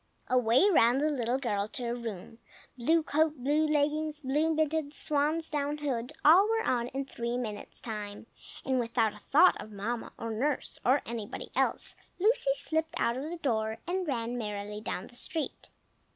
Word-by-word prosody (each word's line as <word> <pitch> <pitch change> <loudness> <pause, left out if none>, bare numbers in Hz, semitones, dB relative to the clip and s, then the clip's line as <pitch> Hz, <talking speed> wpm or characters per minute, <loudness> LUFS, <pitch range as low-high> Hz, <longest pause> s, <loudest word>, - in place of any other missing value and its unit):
Away 250 - +4
ran 245 - +5
the 305 +2 +1
little 250 -2 0
girl 210 -6 -1
to 245 - -4
her 235 0 -1
room. 225 -2 -7 0.4
Blue 315 +7 +2
coat, 310 +1 +1
blue 295 +5 +1
leggings, 300 +1 0
blue 300 +3 +1
mittens, 310 -1 0
swan's 305 +2 +1
down 295 0 -1
hood, 255 -5 -2
all 365 +8 +7
were 450 0 +1
on 240 -1 0
in 270 +2 -4
three 235 -2 -3
minutes' 215 -4 -6
time; 210 -2 -6 0.4
and 260 -1 +1
without 230 -2 +1
a 210 - -13
thought 310 - +4
of 215 - -10
Mamma 225 +4 -4
or 230 - -4
nurse 265 +6 -2
or 260 +4 +3
anybody 225 -3 -6
else, - - +3 0.2
Lucy 415 - +3
slipped 320 +3 -1
out 235 0 +1
of 275 +5 -4
the 345 - -5
door, 220 -7 -1
and 365 0 -2
ran 240 -3 -2
merrily 210 -1 -4
down 190 - -4
the - - -15
street. 320 +4 -4
260 Hz, 175 wpm, -30 LUFS, 230-305 Hz, 0.4 s, all